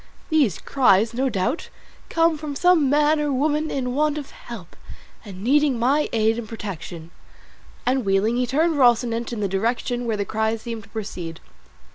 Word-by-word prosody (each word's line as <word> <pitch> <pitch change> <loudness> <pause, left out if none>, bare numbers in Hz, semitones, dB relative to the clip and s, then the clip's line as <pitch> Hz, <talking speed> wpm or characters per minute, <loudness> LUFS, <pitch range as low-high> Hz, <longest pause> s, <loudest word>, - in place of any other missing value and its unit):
These 280 - +3
cries, 225 -4 +3
no 260 +3 0
doubt, 225 - -2 0.4
come 330 0 +3
from 300 -1 -6
some 335 -3 +4
man 300 +2 +3
or 295 -1 0
woman 300 +3 0
in 250 -2 -2
want 300 +2 +1
of 285 -2 -7
help, 215 -8 -10 0.5
and 195 -3 -9
needing 280 +1 +3
my 275 +6 +2
aid 225 0 +2
and 220 -3 -7
protection;" 175 -6 -7 0.7
and 260 +1 +1
wheeling, 200 +3 +2
he 250 0 +1
turned 310 +5 +1
Rocinante 240 -2 +3
in 230 -3 -4
the 200 - +1
direction 235 +5 -1
whence 220 -2 0
the 200 - -1
cries 220 +1 -1
seemed 230 -2 -5
to 205 - -18
proceed. 185 -7 -6
240 Hz, 170 wpm, -23 LUFS, 215-290 Hz, 0.7 s, some